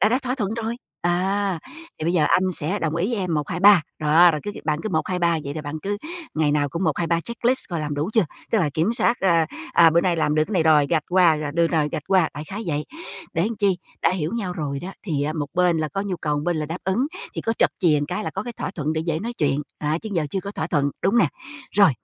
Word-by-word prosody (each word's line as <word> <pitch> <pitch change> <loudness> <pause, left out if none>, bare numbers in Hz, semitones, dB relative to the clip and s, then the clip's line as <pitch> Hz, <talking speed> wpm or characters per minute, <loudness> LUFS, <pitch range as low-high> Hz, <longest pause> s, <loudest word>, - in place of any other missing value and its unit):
đã 210 - +5
đã 250 +4 +2
thỏa 255 0 -1
thuận 215 -4 -2
rồi, 230 0 -3 0.3
à. 190 +2 0 0.4
"Thì 155 - -4
bây 170 - +1
giờ 160 -4 +3
anh 185 - +4
sẽ 175 +5 +1
đồng 160 0 -1
ý 175 +3 +1
với - - 0
em 180 -5 -1
1,2,3." 175 +4 +5 0.2
Đó, 160 +3 +6
rồi 150 -2 -2
cứ 205 - -2
cứ - - -8
bạn 150 -1 0
cứ - - -2
1,2,3, 175 -4 +1
vậy 140 +1 -4
là 155 - -5
bạn 150 +2 -5
cứ 205 +1 -2 0.4
ngày 155 -2 +2
nào 145 -1 +1
cũng 170 +6 -3
1,2,3 170 +1 +1
checklist 235 +5 0
coi 170 -3 -3
làm 150 -1 -3
đủ 150 +8 -2
chưa? 220 -3 +4 0.3
Tức 225 - +3
là 155 -7 +1
kiểm 170 +9 +1
soát, 235 0 +2
a, 170 -4 +3 0.3
à, 165 -1 +7
bữa 170 +2 +4
nay 175 -2 +1
làm 150 -2 +1
được 155 0 +3
cái 215 - -8
này 180 -5 +3
rồi 155 -2 +5
gạch 160 -3 +1
qua, 175 -4 +4
à, 145 - -3
được 170 0 +3
rồi, 155 -3 +1
gạch 150 - -3
qua, 185 -4 +4
đại 150 +1 -6
khái 200 +6 -6
vậy. 150 -2 -1 0.5
Để 170 +6 +1
chi, 195 -4 +2 0.2
đã - - +4
hiểu 170 -4 -2
nhau 200 -6 -2
rồi 145 -5 -3
đó 190 +2 -6
thì 155 -8 -1
á 150 +2 -1
một 150 -2 -3
bên 175 -2 +3
là 155 -1 -1
có 195 +7 -3
nhu 195 -3 -3
cầu, 150 -2 -1
một 145 - -2
bên 175 -1 0
là 150 -1 -2
đáp 165 +4 -5
ứng 210 +8 +1 0.3
thì - - -3
có 225 - 0
trật - - +4
chìa 160 -6 +3
cái 210 - -3
là - - -2
có 195 - -4
cái 240 +2 -6
thỏa 220 - -4
thuận 155 -5 -2
để 160 - -1
dễ 160 -1 -1
nói 235 +7 -4
chuyện, 145 - 0 0.2
à, 150 +2 -1
chứ 220 - -5
giờ 165 -5 0
chưa 195 - -1
có 200 +1 -6
thỏa 160 - -3
thuận, 145 -4 +1
đúng 200 +5 +3
nè? - - +4 0.5
Rồi, 200 -4 +7
170 Hz, 280 wpm, -23 LUFS, 155-195 Hz, 0.5 s, à